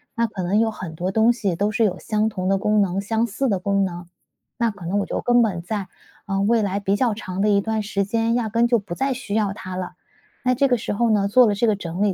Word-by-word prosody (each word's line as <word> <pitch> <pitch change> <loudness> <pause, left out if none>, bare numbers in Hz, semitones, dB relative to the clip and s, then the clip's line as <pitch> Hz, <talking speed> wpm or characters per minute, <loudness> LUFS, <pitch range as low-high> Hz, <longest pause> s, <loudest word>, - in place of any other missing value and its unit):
那 230 - +2
可 200 -3 -6
能 200 +5 +2
有 225 - +2
很 170 -6 -8
多 180 +3 -2
东 225 +3 +4
西 200 -7 -2
都 205 +4 0
是 225 +1 +1
有 195 - 0
相 215 0 0
同 185 -2 -3
的 195 - +3
功 210 +1 +2
能、 195 0 0
相 225 +3 0
似 265 +6 -2
的 195 -3 +1
功 200 +1 +1
能， 175 -1 -6 0.5
那 235 -2 +1
可 195 -4 -11
能 195 - 0
我 - - -1
就 - - -3
根 245 0 +4
本 180 -6 -1
在 195 +1 -4 0.4
呃， 195 0 -1
未 220 +2 +3
来 200 0 -1
比 200 0 0
较 240 -1 +1
长 190 -3 -5
的 210 - +3
一 200 -1 +3
段 220 0 -2
时 200 -1 -1
间， 225 +3 0
压 235 -3 0
根 230 +2 +2
就 235 -2 +3
不 195 -3 -7
再 270 0 0
需 240 -5 -5
要 205 -3 +1
它 185 -2 -7
了。” 185 -1 -4 0.5
那 255 0 +2
这 275 +2 +3
个 245 - +2
时 210 - -3
候 230 +1 +1
呢， 200 -2 +2
做 250 +5 +6
了 210 - +2
这 225 +3 +1
个 215 - +3
整 175 -1 -5
理， 205 -2 +2
205 Hz, 300 characters per minute, -22 LUFS, 195-225 Hz, 0.5 s, 做